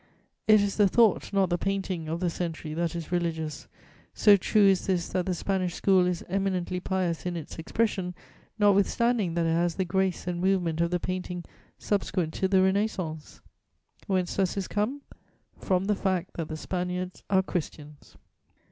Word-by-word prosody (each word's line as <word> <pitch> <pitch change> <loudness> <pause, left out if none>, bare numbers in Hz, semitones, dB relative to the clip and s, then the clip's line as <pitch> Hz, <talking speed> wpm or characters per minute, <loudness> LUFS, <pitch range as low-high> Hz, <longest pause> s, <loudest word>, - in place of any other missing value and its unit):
It 215 -1 +7
is 200 -1 -1
the 205 -2 +5
thought, 220 +1 +3
not 195 -3 +2
the 175 - +1
painting, 190 -4 -2
of 165 +2 -3
the 175 -2 +1
century 165 -3 -4
that 170 +1 -1
is 170 0 -6
religious; 160 -3 -2 0.5
so 210 -2 +7
true 205 +2 +3
is 195 -2 +3
this, 180 -3 0
that 185 -1 -1
the 185 - 0
Spanish 185 -1 -1
School 185 -2 +3
is 180 -1 -2
eminently 185 -1 -1
pious 180 -3 -1
in 175 - -2
its 160 0 -8
expression, 185 0 -1 0.4
notwithstanding 205 -1 +2
that 170 -1 +1
it 165 - +2
has 170 0 +1
the 190 - -1
grace 190 +1 0
and 175 -1 -3
movement 180 -4 +1
of 170 - +2
the 180 0 0
painting 180 -1 -4 0.3
subsequent 185 -5 -1
to 190 - 0
the 190 0 +4
Renascence. 190 -6 -1 0.7
Whence 185 -3 0
does 190 -3 +1
this 195 -2 -2
come? 245 +8 -2 0.6
From 185 0 0
the 210 +1 +1
fact 185 -2 -1
that 165 -2 -4
_the 155 - -5
Spaniards 180 +1 -4
are 190 -1 +3
Christians. 150 -5 -6
185 Hz, 175 wpm, -27 LUFS, 170-195 Hz, 0.7 s, It